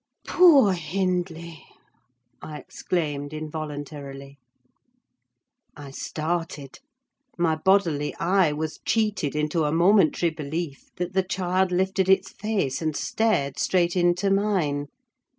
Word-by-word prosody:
"Poor 290 - +6
Hindley!" 170 -2 -3 0.8
I 155 -1 -7
exclaimed, 150 -4 -3
involuntarily. 145 -2 -7 1.4
I 145 -2 -9
started: 155 -1 -4 0.6
my 165 -2 +2
bodily 160 -4 +1
eye 180 -2 +2
was 155 +1 -4
cheated 210 -10 0
into 150 +2 0
a 150 - 0
momentary 175 0 +3
belief 155 -1 -5
that 180 +1 -4
the 190 - +3
child 185 0 0
lifted 190 +1 +1
its 190 0 +3
face 195 -11 -2
and 155 -2 -1
stared 180 -12 0
straight 175 -1 +1
into 180 +2 +2
mine! 185 -8 0
170 Hz, 105 wpm, -25 LUFS, 150-190 Hz, 1.4 s, Poor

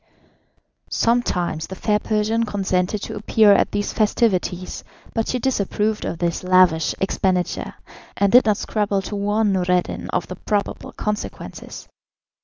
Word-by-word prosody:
Sometimes 180 -9 0
the 190 - -7
fair 210 +2 +1
Persian 215 +2 0
consented 195 -1 -1
to - - -5
appear 215 0 +4
at - - +2
these 205 0 -2
festivities, 195 -4 0 0.3
but 225 - -1
she 255 - 0
disapproved 215 -4 -1
of 165 - -3
this 170 +1 -2
lavish 180 -3 +4
expenditure, 185 -2 -1 0.4
and 200 -1 +2
did 250 -1 +6
not 210 -2 +3
scruple 205 -2 -1
to 205 - -5
warn 205 +1 +1
Noureddin 180 -1 0
of 180 - -1
the 185 - -8
probable 205 -2 -2
consequences. 210 0 -5
205 Hz, 135 wpm, -21 LUFS, 185-215 Hz, 0.4 s, did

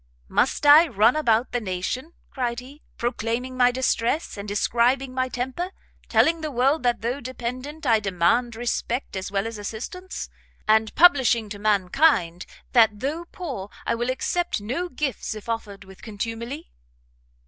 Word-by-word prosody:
"Must - - +1
I 300 +4 +8
run 225 0 +3
about 240 -5 +2
the 245 - -1
nation," 215 - -4 0.2
cried 240 -3 -2
he, 275 +4 -13 0.2
"proclaiming 240 +2 -2
my 250 -1 +5
distress, 255 +3 0
and 200 0 -7
describing 245 +5 +1
my 255 0 -1
temper? 260 +9 -3 0.4
telling 330 0 +3
the 310 - -3
world 270 +3 +2
that 240 -1 +1
though 245 +5 -2
dependent 255 +5 -6
I 225 -3 +4
demand 205 +5 +1
respect 240 +1 -2
as 190 +1 -4
well 195 +1 0
as 225 -2 -5
assistance; 250 - -6 0.4
and 220 0 +3
publishing 260 -10 +5
to 205 0 -7
mankind, 200 - +2 0.2
that 220 -4 +4
though 305 +7 -3
poor 270 - -6 0.2
I - - +1
will 240 +2 -2
accept 345 +6 -1
no 260 +13 -3
gifts 270 -5 -3
if 215 - -10
offered 210 -4 -4
with 190 0 -15
contumely? 230 +7 -6
240 Hz, 150 wpm, -24 LUFS, 215-270 Hz, 0.4 s, I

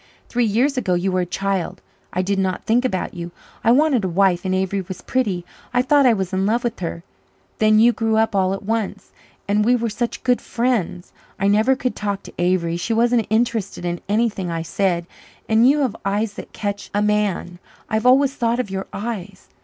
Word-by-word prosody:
"Three 245 0 +1
years 255 +6 +2
ago 190 -7 0
you 185 +2 0
were 185 - +1
a 180 - -3
child. 195 -1 -2 0.3
I 185 - -1
did 195 +1 0
not 190 -1 -1
think 235 +3 +2
about 190 -8 -2
you. 170 -1 -6 0.3
I 225 - +3
wanted 270 -3 +3
a 190 - 0
wife 180 0 +2
and 185 0 +1
Avery 190 +1 0
was 185 0 -8
pretty. 200 -9 -1 0.3
I 245 - +4
thought 280 0 +4
I 240 - +6
was 190 -4 -3
in 190 +1 +1
love 235 +3 +1
with 240 -1 -2
her. 170 -1 -4 0.6
Then 215 0 +5
you 235 +2 +6
grew 225 -1 0
up 220 -1 +2
all 190 0 +2
at 195 - -9
once 220 0 -3 0.4
and 205 +1 +2
we 245 +3 +4
were 230 -2 -1
such 235 +3 -3
good 250 -1 +2
friends 225 -8 -2 0.3
I 195 - +2
never 215 +6 +4
could 255 -1 -2
talk 200 -2 -3
to - - -12
Avery 175 -1 +1
she 220 +6 -2
wasn't 235 0 +2
interested 220 -5 0
in 175 0 -2
anything 210 -4 0
I 165 -1 -2
said 175 0 0 0.4
and 225 +3 +5
you 295 +1 +3
have 250 -6 0
eyes 205 +2 -1
that - - -9
catch 205 -1 -4
a 205 - +2
man 205 -4 0 0.3
I've 220 +2 0
always 270 +2 +5
thought 235 -2 0
of 210 -6 -2
your 190 0 -4
eyes. 200 -3 -6
210 Hz, 210 wpm, -21 LUFS, 190-235 Hz, 0.6 s, I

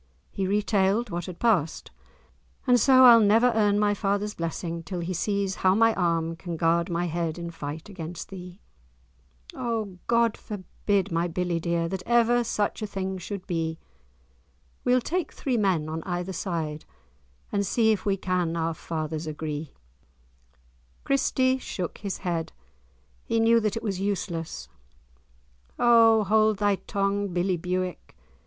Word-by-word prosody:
He 190 -1 -2
retailed 205 +2 +1
what 175 +2 -4
had 180 -2 -7
passed, 185 -10 0 0.7
"and 250 -2 +5
so 260 +2 +7
I'll 235 -2 +9
never 225 +4 +4
earn 205 -2 +3
my 205 0 +3
father's 205 +1 -1
blessing, 165 0 -4
till 175 +2 -5
he 175 +2 -3
sees 200 +1 -1
how 185 0 +3
my 225 +1 +4
arm 165 -3 0
can 170 0 -6
guard 170 +2 +2
my 170 0 -1
head 165 -1 -2
in 170 -1 -5
fight 155 +1 -7
against 175 -4 -7
thee." 180 -1 -9 0.9
"O 220 -6 -3
God 235 -1 +2
forbid, 200 -1 -2
my 165 +1 +1
billie 175 0 -1
dear, 170 0 -1
That 190 +1 -4
ever 240 0 +4
such 210 -1 -1
a 215 - -2
thing 190 -1 -4
should 195 +1 -6
be! 165 -3 -2 1.1
We'll 250 0 +3
take 350 +7 -2
three 260 -3 -2
men 190 -8 +1
on 160 +1 -4
either 180 +2 -3
side, 160 -4 -3 0.7
And 200 -1 +1
see 220 +3 +2
if 210 - -1
we 200 -2 +1
can 180 -3 -1
our 165 0 0
fathers 160 -1 -4
agree." 155 0 -5 1.3
Christie 260 -1 +2
shook 180 -8 -5
his 200 -2 -4
head. 170 -3 -3 0.7
He 230 - 0
knew 230 +1 +5
that 215 -1 -1
it - - -5
was 195 -4 -2
useless. 170 - -3 1.1
"O 230 -2 +6
hold 215 +1 +3
thy 205 -1 +2
tongue, 200 +1 -1
billie 180 0 0
Bewick. 180 +1 -4
190 Hz, 150 wpm, -26 LUFS, 170-215 Hz, 1.3 s, I'll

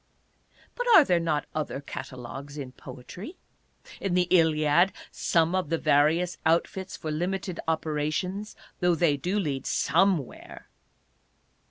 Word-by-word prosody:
But - - -3
are 325 - +10
there 180 -10 +2
not 160 -3 -1
other 155 -3 -3
catalogues 135 0 -8
in 135 -3 -6
poetry? 135 - -10 0.6
In 190 -3 -1
the 180 -1 +3
Iliad 160 +1 +4 0.2
some 165 0 +1
of 185 -4 0
various 165 +2 +2
outfits 175 +3 0
for 155 - -5
limited 180 +3 -3
operations, 160 +6 -2 0.2
though 180 -2 +3
they 160 -3 +3
do 180 +9 -2
lead 145 -9 -2
somewhere. 170 -3 0
165 Hz, 120 wpm, -27 LUFS, 145-180 Hz, 0.6 s, are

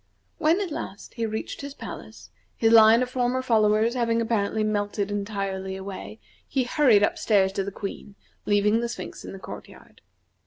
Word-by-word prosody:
When 325 +3 +3
at 375 -5 -3
last, 200 -8 -7
he 230 -2 -2
reached 220 0 -5
his 280 0 -7
palace, 105 -5 -10 0.3
his 225 0 +3
line 225 +2 +7
of 250 - -4
former 255 0 0
followers 220 -1 +3
having 230 -2 +1
apparently 220 -2 0
melted 205 -1 -1
entirely 195 -2 -3
away, 190 - -8 0.3
he 265 -2 0
hurried 245 -5 +4
up - - +1
stairs 195 -3 +3
to 195 0 -2
the 200 - -5
Queen, 200 +1 -7 0.3
leaving 210 +2 +3
the 235 0 -2
Sphinx - - -7
in - - -8
the 195 - -8
court 190 - -9
yard. - - -17
215 Hz, 180 wpm, -25 LUFS, 200-235 Hz, 0.3 s, line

